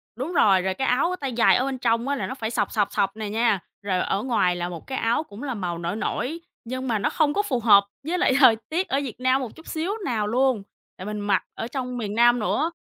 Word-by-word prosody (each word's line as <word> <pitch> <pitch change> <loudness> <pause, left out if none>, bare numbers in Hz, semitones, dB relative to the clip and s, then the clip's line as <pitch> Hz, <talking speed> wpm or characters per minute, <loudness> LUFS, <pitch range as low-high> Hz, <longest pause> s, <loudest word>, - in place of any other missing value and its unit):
Đúng 265 +9 -4
rồi, 200 - +4
rồi 190 +1 -1
cái 265 +6 -2
áo 335 +9 +2
tay 270 -3 -3
dài 230 - +5
ở 255 - +1
bên 270 -1 -3
trong 235 0 0
á 285 - 0
là 270 - -3
nó - - -4
phải 225 -4 -3
sọc, 215 -4 -1
sọc, 205 -2 0
sọc 195 0 0
nè 215 -2 -4
nha, 220 -2 +2 0.2
rồi 195 -3 -1
ở 195 +2 -1
ngoài 205 -8 +1
là 175 0 -3
một 170 -2 -9
cái 265 - -3
áo 230 +7 +1
cũng 215 -5 -11
là 270 -3 -2
màu 180 -6 -3
nổi 170 +3 -3
nổi, 275 +7 -3 0.2
nhưng 255 +2 -5
mà 225 -3 0
nó 200 - +1
không 300 -2 +1
có 405 - +2
phù 265 -11 -1
hợp 205 -3 +6 0.2
với 355 +3 0
lại 350 -7 +3
thời 255 -5 +7
tiết 355 +4 -1
ở 270 - 0
Việt 250 -4 -7
Nam 255 +1 +2
một 245 -4 -6
chút 320 - -15
xíu 330 +4 -2
nào 220 -5 -1
luôn, 250 -1 +1 0.3
tại 185 - -8
mình 210 0 -4
mặc 205 -1 +1
ở 225 - -5
trong 250 0 -4
miền 210 -3 -4
Nam 240 +1 +5
nữa. 310 +9 0
240 Hz, 270 wpm, -24 LUFS, 205-265 Hz, 0.3 s, thời